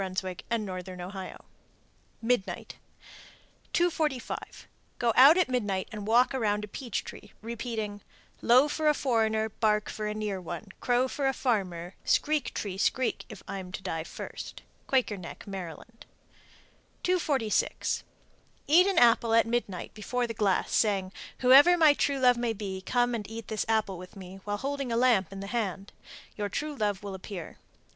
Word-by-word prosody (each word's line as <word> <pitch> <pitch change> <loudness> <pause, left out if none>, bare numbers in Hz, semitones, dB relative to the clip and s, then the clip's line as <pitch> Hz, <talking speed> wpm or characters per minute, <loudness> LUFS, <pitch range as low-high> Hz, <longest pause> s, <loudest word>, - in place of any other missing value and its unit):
and 230 -2 0
Northern 185 -1 -6
Ohio._ 185 +1 -7 0.8
MIDNIGHT. 235 -4 -1 0.9
245. 315 -7 -1 0.3
Go 235 -2 +2
out 280 +7 +9
at 365 - +3
midnight 205 -7 -1
and 210 -1 -6
walk 240 +4 +4
around 210 -5 0
a - - -5
peach 235 +1 -4
tree, - - -11
repeating, 225 -3 -4 0.4
Low 255 +4 +6
for 310 +1 -1
a 300 - +5
foreigner, 220 -5 +1
Bark 210 -1 0
for 215 -1 -4
a 210 - -3
near 210 -3 -3
one, 175 +4 -7
Crow 245 +1 +2
for 275 +1 -1
a 270 - +2
farmer, 185 -8 -1
Screek, 300 -3 +1
tree, 195 -2 -4
screek, 255 +4 0
if 215 -3 -10
I'm 190 -2 -6
to 195 - -5
die 165 -4 -3
first. - - -8 0.2
Quaker 255 -6 +1
Neck, 180 -2 -9
Md. 195 +3 -8 1.0
246. 290 - 0 0.6
Eat 350 +6 +6
an 390 - 0
apple 230 -1 +5
at 230 - +5
midnight 230 -6 -3
before 245 +4 -2
the 230 - -4
glass, 205 -4 +1
saying, 195 -4 +2 0.3
"Whoever 280 +8 +8
my 315 -3 +7
true 280 -1 0
love 250 -2 +5
may 240 -1 0
be, 195 -3 -5
come 245 +4 +1
and 215 -3 -4
eat 225 0 -7
this 220 - -2
apple 215 -5 +1
with 180 +2 -11
me," 190 0 -10
while 205 0 -2
holding 275 0 -3
a 230 - +1
lamp 235 -8 +3
in 195 0 -7
the - - -5
hand. 200 -3 -3 0.4
Your 205 -1 -2
true 300 +9 -3
love 205 -5 -1
will 200 -1 -5
appear. 185 -3 -8
220 Hz, 160 wpm, -29 LUFS, 195-250 Hz, 1.0 s, out